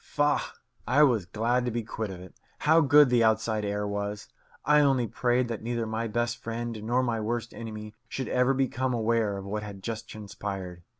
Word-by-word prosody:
Faugh! 145 0 0 0.3
I 145 +4 +5
was 115 -10 +3
glad 120 +5 0
to - - 0
be 120 0 -2
quit 110 -1 -4
of 95 -2 -7
it. 90 - -12 0.3
How 160 +2 +5
good 145 -1 +6
the 120 -1 +4
outside 110 -1 +2
air 105 0 -2
was! 100 +1 -4 0.4
I 150 0 +5
only 135 -4 +3
prayed 120 +3 +1
that 115 - -4
neither 115 0 -2
my 110 +1 -2
best 120 +2 -1
friend 115 -1 -5
nor 120 +4 +1
my 115 -3 0
worst 120 +2 -3
enemy 110 -2 -7 0.2
should 130 - -4
ever 125 +2 +2
become 130 -1 0
aware 110 -3 +1
of 95 - -7
what 105 +2 -3
had 100 -2 -9
just 115 -1 -5
transpired. 100 -4 -6
115 Hz, 195 wpm, -28 LUFS, 105-125 Hz, 0.4 s, good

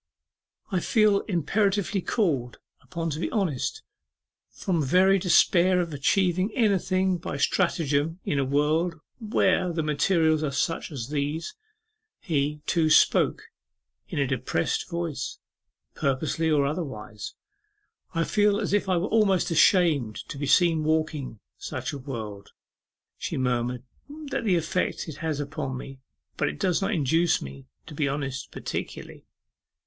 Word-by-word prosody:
'I 185 - +1
feel 210 +1 +3
imperatively 200 +2 0
called 145 - -1 0.2
upon 165 -2 -4
to 150 - -4
be - - -1
honest, 175 - -1 0.7
from 175 -4 -1
very 185 +7 +4
despair 180 0 +4
of 170 -3 -2
achieving 185 +6 +1
anything 190 -4 +2
by 140 - -5
stratagem 160 0 +1
in 145 - 0
a - - +2
world 150 +5 +1 0.2
where 195 -5 +1
the 165 -1 -1
materials 155 +1 +2
are 155 - 0
such 165 +5 -2
as 130 -4 -5
these.' 150 +2 -2 0.7
He, 150 -3 -1
too, 165 -2 +2
spoke 155 - +4 0.6
in - - -6
a 140 - +2
depressed 125 - -1
voice, 170 -6 -4 0.6
purposely 150 +4 0
or 145 -3 +3
otherwise. 130 - -5 0.8
'I 165 - +2
feel 205 +2 +2
as 205 - -2
if 205 -2 +1
I 185 - +3
were 170 - 0
almost 200 -5 +2
ashamed 160 - +4
to 140 - -6
be 145 - -2
seen 165 +1 +4
walking 155 -6 -1 0.2
such - - -4
a 140 - -5
world,' 110 -7 -7 0.7
she - - -3
murmured; 125 -1 -1 0.3
'that's 285 -4 -5
the 190 -4 +3
effect 170 +3 -1
it 155 - -7
has 160 -3 -2
upon 140 -2 -4
me; 135 +1 -9 0.4
but - - +1
it 75 - -8
does 180 +2 +1
not 195 - 0
induce 165 -1 +2
me 70 -1 -9 0.2
to 165 - -10
be 145 -1 0
honest 135 -2 -4
particularly. - - -6
160 Hz, 140 wpm, -26 LUFS, 140-185 Hz, 0.8 s, very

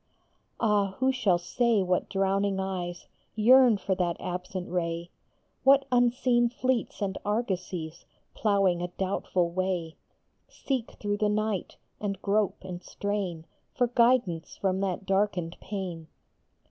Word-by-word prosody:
Ah, 205 -3 +2
who 260 +1 +3
shall 210 -9 +2
say 225 +4 +1
what 180 0 0
drowning 195 0 +1
eyes 180 -2 -4 0.3
Yearn 240 +1 +6
for 195 - -1
that 175 -2 -1
absent 180 0 -4
ray; 170 -1 -2 0.5
What 275 +1 +6
unseen 245 0 +3
fleets 250 -3 -1
and 195 -1 -2
argosies, 185 -6 -3 0.3
Ploughing 195 -5 +2
a 175 - -1
doubtful 180 -1 -1
way, 180 -3 -2 0.5
Seek 260 -5 -3
through 205 0 -2
the 210 0 +1
night, 210 -2 -1 0.2
and 200 -2 -3
grope 200 -1 0
and 180 -2 -6
strain 190 -4 -3 0.3
For 250 - +3
guidance 235 -9 +2
from 190 -1 0
that 195 0 -2
darkened 190 -3 0
pane 180 -6 -5
195 Hz, 125 wpm, -28 LUFS, 180-215 Hz, 0.5 s, Yearn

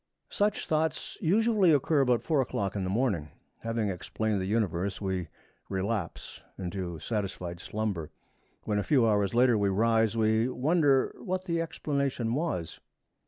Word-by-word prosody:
Such 205 0 0
thoughts 160 0 -1
usually 205 +1 +4
occur 145 0 +3
about 125 -3 +2
four 155 -4 +2
o'clock 100 -6 -2
in 100 - -1
the 95 - -2
morning. 100 - 0 0.3
Having 115 -2 -1
explained 100 +3 -2
the 95 - -2
Universe, 100 -3 0
we 95 -3 -2 0.4
relapse 95 -1 -3 0.2
into 90 -2 -4
satisfied 90 -2 -4
slumber. 100 -8 -3 0.5
When, 105 -1 0
a - - 0
few 130 -3 +3
hours 105 0 +1
later, 120 -2 +4
we 100 -1 +2
rise, 110 +2 +2
we 110 +2 +2
wonder 140 0 +2
what 185 0 -3
the 170 -2 0
explanation 140 -7 -1
was. 135 - -2
110 Hz, 145 wpm, -29 LUFS, 95-140 Hz, 0.5 s, usually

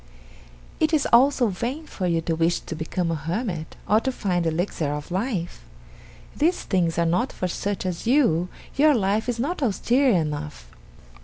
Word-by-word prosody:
"It 315 +1 +2
is 295 - +1
also 255 -1 +5
vain 245 - -4
for 185 -10 -3
you 165 -1 +1
to 165 0 -1
wish 165 +1 +1
to 165 - -6
become 165 +2 -2
a - - 0
hermit, 165 - -4
or 215 +2 +4
to 265 - -1
find 180 -8 -1
the - - +3
Elixir 160 -2 -1
of 150 +3 -7
Life. 185 - -3 0.7
These 335 +5 +1
things 170 -4 0
are 170 - +2
not 180 +11 +1
for 185 - -3
such 195 +2 -3
as 180 +3 -3
you 205 - +3 0.3
your 295 +1 +5
life 215 +2 0
is 240 - -1
not 300 +8 -2
austere 255 +3 +2
enough. 150 - -1
185 Hz, 175 wpm, -24 LUFS, 165-245 Hz, 0.7 s, also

